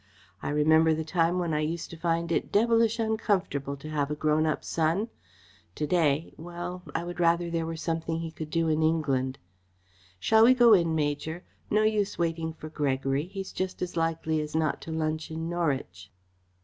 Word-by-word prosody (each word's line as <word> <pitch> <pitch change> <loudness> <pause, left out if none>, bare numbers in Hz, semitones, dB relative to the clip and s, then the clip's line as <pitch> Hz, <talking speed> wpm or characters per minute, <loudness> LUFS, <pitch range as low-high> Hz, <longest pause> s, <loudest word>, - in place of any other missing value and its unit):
I - - -3
remember 160 +2 +4
the 160 - -2
time 170 +1 +1
when 170 -3 -1
I 150 - +1
used 160 +2 -3
to - - -7
find 170 0 -1
it - - 0
devilish 230 +1 +3
uncomfortable 200 - -1
to 155 +3 -9
have 145 -2 0
a 150 - -2
grown 155 +1 +2
up 155 - -1
son. 170 +8 0 0.7
To 150 - -1
day 155 -2 +1
well, 175 +2 -6
I 165 - 0
would 175 0 -6
rather 170 0 +2
there 165 -1 -1
were 165 - -4
something 165 0 -2
he 165 -1 -5
could 155 -1 -7
do 165 0 +1
in 155 0 +1
England. 140 -5 +1 0.8
Shall 220 - +5
we 255 +3 +7
go 240 -3 +7
in, 170 -4 +3
Major? 155 +3 -2 0.3
No 215 +1 +3
use 215 -2 +1
waiting 165 -1 -1
for 160 -1 -9
Gregory. 135 -1 -1
He's 195 0 -6
just 185 0 -3
as 180 - -5
likely 165 -1 0
as 150 +1 -6
not 160 -2 0
to 165 - -7
lunch 155 0 -2
in 160 +1 -4
Norwich." 135 - -2
165 Hz, 190 wpm, -28 LUFS, 155-175 Hz, 0.8 s, we